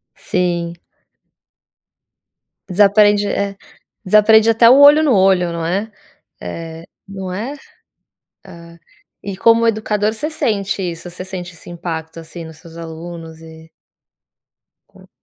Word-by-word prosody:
Sim. 170 Hz, -1 st, -2 dB, 1.9 s
Desaprende, 205 Hz, +2 st, +4 dB
é, 200 Hz, 0 st, -2 dB, 0.5 s
desaprende 215 Hz, +3 st, +5 dB
até 230 Hz, +1 st, +5 dB
o 260 Hz, -, +7 dB
olho 290 Hz, +2 st, +8 dB
no 290 Hz, -5 st, +3 dB
olho, 185 Hz, -3 st, +3 dB
não 170 Hz, -1 st, -4 dB
é, 200 Hz, +6 st, -2 dB, 0.5 s
eh, 165 Hz, -, -7 dB, 0.2 s
não 190 Hz, -1 st, -7 dB
é? 230 Hz, +10 st, -5 dB, 0.9 s
Ah, 170 Hz, -3 st, -14 dB, 0.4 s
e 200 Hz, -1 st, -6 dB
como 230 Hz, +3 st, +4 dB
educador 215 Hz, -1 st, 0 dB
você 300 Hz, +8 st, -4 dB
sente 205 Hz, -10 st, -2 dB
isso, 175 Hz, 0 st, -5 dB
você 180 Hz, +1 st, -8 dB
sente 180 Hz, -1 st, -7 dB
esse -, -, -15 dB
impacto, 165 Hz, -1 st, -6 dB
assim, 165 Hz, +1 st, -10 dB
nos 160 Hz, -1 st, -12 dB
seus 165 Hz, -1 st, -15 dB
alunos 165 Hz, 0 st, -9 dB
e 160 Hz, 0 st, -14 dB, 1.2 s
Co -, -, -19 dB
185 Hz, 120 wpm, -17 LUFS, 170-210 Hz, 1.9 s, olho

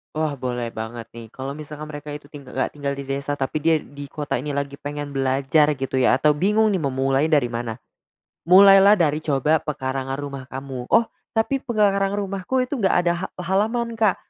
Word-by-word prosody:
Wah, 155 Hz, -3 st, -1 dB
boleh 120 Hz, -2 st, -3 dB
banget 115 Hz, +1 st, -6 dB
nih 115 Hz, -1 st, -10 dB
kalau 130 Hz, +4 st, -6 dB
misalkan 150 Hz, +1 st, -8 dB
mereka 145 Hz, 0 st, -8 dB
itu 150 Hz, 0 st, -12 dB
ting 145 Hz, -3 st, -11 dB
nggak 130 Hz, +1 st, -2 dB
tinggal 140 Hz, -1 st, -3 dB
di 140 Hz, -, -6 dB
desa, 140 Hz, +1 st, -3 dB
tapi 140 Hz, +2 st, -2 dB
dia 160 Hz, +2 st, +3 dB
di 145 Hz, -1 st, -10 dB
kota 145 Hz, -3 st, -3 dB
ini 145 Hz, +2 st, -4 dB
lagi 140 Hz, 0 st, -3 dB
pengen 145 Hz, 0 st, -5 dB
belajar 135 Hz, +2 st, +2 dB
gitu 135 Hz, -1 st, -2 dB
ya -, -, +4 dB
atau 150 Hz, +3 st, +3 dB
bingung 210 Hz, +8 st, +2 dB
nih 190 Hz, -, 0 dB
memulai 135 Hz, 0 st, +1 dB
dari 145 Hz, -7 st, +2 dB
mana. 115 Hz, -1 st, -3 dB, 0.7 s
Mulailah 195 Hz, +3 st, +8 dB
dari 155 Hz, -6 st, +2 dB
coba 150 Hz, 0 st, +2 dB
pekarangan 135 Hz, -2 st, -3 dB
rumah 140 Hz, -2 st, -6 dB
kamu, 130 Hz, -2 st, -7 dB
"Oh, 230 Hz, +1 st, +6 dB, 0.3 s
tapi 225 Hz, +4 st, +1 dB
pekarangan 200 Hz, -6 st, +1 dB
rumahku 200 Hz, +6 st, -1 dB
itu 260 Hz, +3 st, -4 dB
enggak 195 Hz, -5 st, +2 dB
ada 170 Hz, -, +4 dB
ha -, -, -5 dB
halaman 225 Hz, +6 st, 0 dB
Kak." 215 Hz, -4 st, +3 dB
145 Hz, 190 wpm, -22 LUFS, 135-190 Hz, 0.7 s, Mulailah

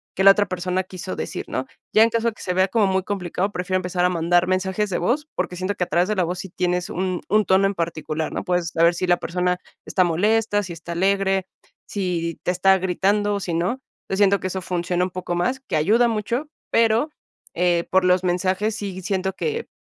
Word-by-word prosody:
que 190 Hz, -, +1 dB
la 195 Hz, -, +11 dB
otra 205 Hz, +1 st, +2 dB
persona 185 Hz, +1 st, -1 dB
quiso 185 Hz, 0 st, -7 dB
decir, -, -, -5 dB
¿no? -, -, -3 dB, 0.3 s
Ya 220 Hz, -, +7 dB
en 230 Hz, -, +4 dB
caso 230 Hz, 0 st, 0 dB
de 230 Hz, -, 0 dB
que -, -, -15 dB
se 180 Hz, -, -2 dB
vea 185 Hz, +1 st, +3 dB
como 210 Hz, +2 st, +2 dB
muy 190 Hz, 0 st, +1 dB
complicado, 190 Hz, 0 st, -2 dB
prefiero 185 Hz, +1 st, -1 dB
empezar 180 Hz, -1 st, -1 dB
a 180 Hz, -, +4 dB
mandar 175 Hz, 0 st, +2 dB
mensajes 190 Hz, +3 st, 0 dB
de 180 Hz, -, -1 dB
voz, 250 Hz, -, 0 dB
porque 180 Hz, 0 st, -2 dB
siento 185 Hz, +3 st, -2 dB
que 180 Hz, -, -1 dB
a -, -, -18 dB
través 175 Hz, +3 st, +1 dB
de 215 Hz, -, +1 dB
la 185 Hz, -, +3 dB
voz 180 Hz, +2 st, -3 dB
sí 190 Hz, -, -6 dB
tienes 180 Hz, 0 st, -1 dB
un 185 Hz, -1 st, -2 dB
un 215 Hz, +1 st, +3 dB
tono 190 Hz, +1 st, +4 dB
en 200 Hz, -, -1 dB
particular, 160 Hz, -2 st, -3 dB
¿no? -, -, -3 dB
Puedes 180 Hz, -3 st, 0 dB
saber 170 Hz, +1 st, +3 dB
si 185 Hz, +1 st, -2 dB
la 175 Hz, 0 st, +4 dB
persona 180 Hz, +1 st, -1 dB, 0.3 s
está 185 Hz, -, +2 dB
molesta, 205 Hz, +5 st, +2 dB
si 185 Hz, -, -7 dB
está 165 Hz, +1 st, -9 dB
alegre, 195 Hz, +1 st, +1 dB, 0.4 s
si 175 Hz, -4 st, -2 dB
te -, -, +1 dB
está 190 Hz, +2 st, +4 dB
gritando 200 Hz, +3 st, +1 dB
o -, -, -1 dB
si 175 Hz, -, -3 dB
no. 180 Hz, +11 st, -1 dB, 0.3 s
Yo -, -, 0 dB
siento 200 Hz, -1 st, +4 dB
que 185 Hz, -, -3 dB
eso 185 Hz, 0 st, -4 dB
funciona 180 Hz, 0 st, -1 dB
un -, -, -4 dB
poco 180 Hz, -1 st, -4 dB
más, 250 Hz, +10 st, 0 dB
que 265 Hz, -, -4 dB
ayuda 220 Hz, +10 st, +4 dB
mucho, 230 Hz, +6 st, -2 dB, 0.2 s
pero, 230 Hz, +5 st, +3 dB, 0.4 s
eh, 175 Hz, -1 st, +1 dB
por 190 Hz, 0 st, +4 dB
los 180 Hz, 0 st, +3 dB
mensajes 185 Hz, +4 st, 0 dB
sí 195 Hz, -4 st, -5 dB
siento 190 Hz, +1 st, -1 dB
que, 460 Hz, -, -3 dB
185 Hz, 230 wpm, -22 LUFS, 180-205 Hz, 0.4 s, la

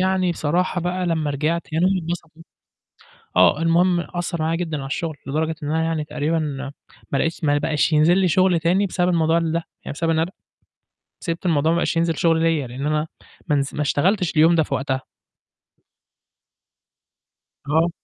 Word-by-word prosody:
يعني 185 Hz, -1 st, +1 dB
بصراحة 175 Hz, +3 st, 0 dB
بقى 180 Hz, +1 st, -2 dB
لمّا 160 Hz, -3 st, 0 dB
رجعت 155 Hz, +4 st, -2 dB
يعني 160 Hz, +3 st, +1 dB
هم 190 Hz, 0 st, +2 dB
اتبسطوا، 165 Hz, -1 st, -6 dB, 0.9 s
آه، 90 Hz, -, +5 dB
المهم 175 Hz, +2 st, +3 dB
أثّر 175 Hz, -1 st, -4 dB
عليّا 160 Hz, +1 st, 0 dB
جدًا 165 Hz, -3 st, -3 dB
على 135 Hz, -, -6 dB
الشغل 155 Hz, +2 st, -3 dB
لدرجة 155 Hz, +4 st, -1 dB
إن 145 Hz, -, -4 dB
أنا 160 Hz, +1 st, +1 dB
يعني 160 Hz, -2 st, -1 dB
تقريبًا، 150 Hz, +2 st, -1 dB, 0.7 s
ما 140 Hz, -, +2 dB
لقيتش 165 Hz, +3 st, -2 dB
ما 145 Hz, -1 st, +3 dB
بقاش 150 Hz, +2 st, 0 dB
ينزل 155 Hz, +4 st, +4 dB
لي 190 Hz, -1 st, +3 dB
شغل 185 Hz, 0 st, +3 dB
تاني 185 Hz, +5 st, +2 dB
بسبب 180 Hz, -1 st, 0 dB
الموضوع 165 Hz, -2 st, +2 dB
ده 165 Hz, 0 st, -1 dB, 0.2 s
يعني -, -, -5 dB
بسبب 165 Hz, +3 st, -1 dB
إن 160 Hz, -, +1 dB
أنا 165 Hz, +2 st, 0 dB
ب -, -, -36 dB, 0.9 s
سِبت 170 Hz, +1 st, -3 dB
الموضوع 160 Hz, -1 st, +2 dB
ما -, -, +1 dB
بقاش 170 Hz, -, 0 dB
ينزل 165 Hz, -1 st, +1 dB
شغل 165 Hz, 0 st, +2 dB
ليّا 165 Hz, -4 st, +1 dB
لإن 130 Hz, +4 st, -5 dB
أنا 150 Hz, +1 st, 0 dB, 0.4 s
ما 150 Hz, -, +3 dB
نز 140 Hz, 0 st, -2 dB
ما 150 Hz, -, -1 dB
اشتغلتش 180 Hz, +6 st, +1 dB
اليوم 160 Hz, +2 st, +6 dB
ده 165 Hz, -, +4 dB
في 140 Hz, -, -3 dB
وقتها. 130 Hz, 0 st, -2 dB, 2.7 s
آه. 160 Hz, +3 st, +2 dB
165 Hz, 180 wpm, -22 LUFS, 150-175 Hz, 2.7 s, اليوم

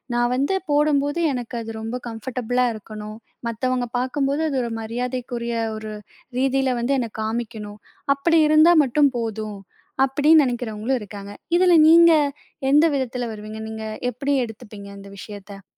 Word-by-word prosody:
நான் 240 Hz, 0 st, +2 dB
வந்து 280 Hz, +9 st, +1 dB, 0.2 s
போடும்போது 290 Hz, +1 st, +2 dB
எனக்கு 245 Hz, -1 st, -5 dB
அது 225 Hz, 0 st, -6 dB
ரொம்ப 225 Hz, +2 st, -4 dB
கம்ஃபர்டபுளா 245 Hz, +2 st, -2 dB
இருக்கணும். 215 Hz, 0 st, -9 dB, 0.3 s
மத்தவங்க 250 Hz, +2 st, -1 dB
பார்க்கும்போது 275 Hz, +3 st, -1 dB
அது 275 Hz, -, -2 dB
ஒரு 235 Hz, -, -4 dB
மரியாதைக்குரிய 240 Hz, 0 st, -4 dB, 0.2 s
ஒரு 215 Hz, 0 st, -6 dB, 0.5 s
ரீதியில 265 Hz, -1 st, +1 dB
வந்து 255 Hz, +4 st, +1 dB
என்ன 235 Hz, -2 st, -2 dB
காமிக்கணும் 220 Hz, -2 st, -5 dB, 0.3 s
அப்படி 330 Hz, +4 st, +2 dB
இருந்தா 310 Hz, +3 st, +6 dB
மட்டும் 280 Hz, +2 st, +3 dB
போதும், 220 Hz, -3 st, -4 dB, 0.5 s
அப்படின்னு 295 Hz, +3 st, +4 dB
நினைக்கிறவங்களும் 240 Hz, 0 st, -2 dB
இருக்காங்க. 200 Hz, 0 st, -9 dB, 0.3 s
இதில 360 Hz, -1 st, +5 dB
நீங்க 335 Hz, +1 st, +8 dB, 0.6 s
எந்த 300 Hz, +3 st, +6 dB
விதத்துல 250 Hz, -2 st, -2 dB
வருவீங்க? 215 Hz, +1 st, -8 dB
நீங்க 220 Hz, 0 st, -6 dB, 0.3 s
எப்படி 275 Hz, +4 st, -2 dB
எடுத்துப்பீங்க? 210 Hz, -3 st, -11 dB
இந்த 200 Hz, 0 st, -12 dB
விஷயத்த. 200 Hz, -1 st, -10 dB
245 Hz, 135 wpm, -22 LUFS, 220-275 Hz, 0.6 s, நீங்க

